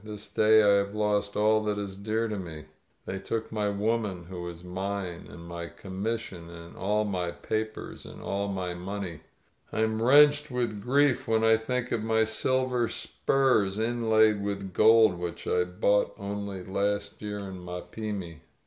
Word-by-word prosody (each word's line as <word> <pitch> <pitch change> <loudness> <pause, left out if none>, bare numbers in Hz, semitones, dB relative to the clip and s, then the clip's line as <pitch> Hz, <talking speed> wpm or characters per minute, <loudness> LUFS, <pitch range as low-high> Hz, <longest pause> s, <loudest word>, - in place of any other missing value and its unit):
"This 105 -1 -8
day 110 0 +5
I 100 -1 +5
have 100 +1 -1
lost 105 -1 0
all 110 +1 +3
that 105 -1 0
is 100 -2 -4
dear 110 +3 -1
to 105 -2 -3
me. 80 -4 -8 0.4
They 95 - -4
took 110 +3 -3
my 105 -2 0
woman 100 -3 -1
who 90 -1 -5
was 85 0 -7
mine, 95 -1 -4
and 85 0 -11
my 85 0 -5
commis 100 +6 -4
sion 85 -6 -10
and 85 0 -11
all 105 +2 0
my 90 -4 -1
papers, 110 +4 -4
and - - -11
all 100 +1 -2
my 95 -3 -3
money. 90 -1 -5 0.5
But - - -7
I 110 - +3
am 110 0 0
wrenched 145 +4 +6
with 120 -5 -2
grief 140 +3 +2
when 110 0 +2
I 115 0 +6
think 125 +2 -2
of 110 - 0
my 110 0 +2
silver 125 +2 +1
spurs 110 -10 +1
inlaid 110 -2 +3
with 100 -2 -4
gold, 110 -4 +6
which 85 -1 -5
I 90 0 +2
bought 100 +3 +1
only 100 -1 -5
last 100 +2 -2
year 105 -1 -4
in 95 -3 -7
Mapimi!" 90 -1 -6
105 Hz, 175 wpm, -28 LUFS, 95-110 Hz, 0.5 s, wrenched